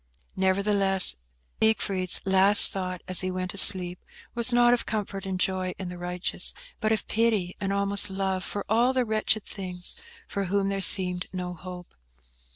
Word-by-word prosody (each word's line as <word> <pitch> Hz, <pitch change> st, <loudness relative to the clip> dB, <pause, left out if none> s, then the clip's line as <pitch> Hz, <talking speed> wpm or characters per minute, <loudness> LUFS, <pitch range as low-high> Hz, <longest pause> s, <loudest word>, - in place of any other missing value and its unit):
Nevertheless, 195 Hz, -, 0 dB, 0.5 s
Siegfried's 195 Hz, -4 st, 0 dB
last 195 Hz, +2 st, +4 dB
thought, 185 Hz, -2 st, -6 dB
as 185 Hz, -1 st, +2 dB
he 185 Hz, -, -3 dB
fell 185 Hz, 0 st, -4 dB
asleep, 180 Hz, -2 st, +6 dB, 0.3 s
was 235 Hz, +1 st, +1 dB
not 240 Hz, 0 st, +3 dB
of 245 Hz, -, -2 dB
comfort 200 Hz, -2 st, -5 dB
and 185 Hz, -1 st, -4 dB
joy 185 Hz, -1 st, -2 dB
in 185 Hz, -2 st, -7 dB
the 180 Hz, -, -9 dB
righteous, 180 Hz, 0 st, -3 dB, 0.2 s
but 220 Hz, -1 st, -1 dB
of 220 Hz, -, -2 dB
pity 215 Hz, -5 st, -1 dB
and 195 Hz, -1 st, -3 dB
almost 200 Hz, +1 st, +4 dB
love 190 Hz, -1 st, -3 dB
for 200 Hz, +2 st, -6 dB
all 235 Hz, +4 st, +1 dB
the 255 Hz, -1 st, 0 dB
wretched 220 Hz, 0 st, -1 dB
things 180 Hz, -3 st, -6 dB, 0.3 s
for 200 Hz, -1 st, -4 dB
whom 195 Hz, +1 st, -1 dB
there 195 Hz, 0 st, -3 dB
seemed 180 Hz, -2 st, +3 dB
no 180 Hz, -1 st, -6 dB
hope. 180 Hz, 0 st, -11 dB
195 Hz, 165 wpm, -25 LUFS, 185-210 Hz, 0.5 s, asleep